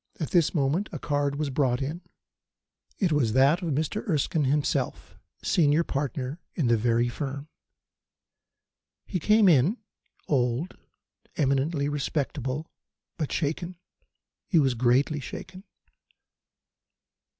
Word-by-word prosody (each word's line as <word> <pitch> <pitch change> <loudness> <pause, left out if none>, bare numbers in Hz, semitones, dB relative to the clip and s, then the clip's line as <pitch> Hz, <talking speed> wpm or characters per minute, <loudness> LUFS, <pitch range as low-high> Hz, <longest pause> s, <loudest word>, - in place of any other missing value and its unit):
At 155 - -3
this 175 -1 +3
moment 155 +8 +1
a - - -4
card 145 -1 -1
was 145 -1 -2
brought 130 -2 +1
in. 150 +6 -4 1.0
It 185 -5 +1
was 130 -8 +2
that 140 +7 +4
of 170 -3 -2
Mr. 155 +7 -1
Erskine 155 -1 +1
himself, 145 +2 -1 0.3
senior 155 0 +3
partner 140 0 -3 0.2
in 155 - 0
the 120 - +5
very 115 +1 +2
firm. 140 +3 -5 1.6
He 185 - -3
came 210 +4 +4
in, 165 - +4 0.5
old, 130 +4 0 0.6
eminently 140 +1 +1
respectable, 145 -1 -2 0.5
but 155 - -2
shaken. 170 +4 -2 0.7
He 175 - +2
was 135 -5 +4
greatly 130 +5 +2
shaken. 185 +7 -9
145 Hz, 115 wpm, -27 LUFS, 135-165 Hz, 1.6 s, the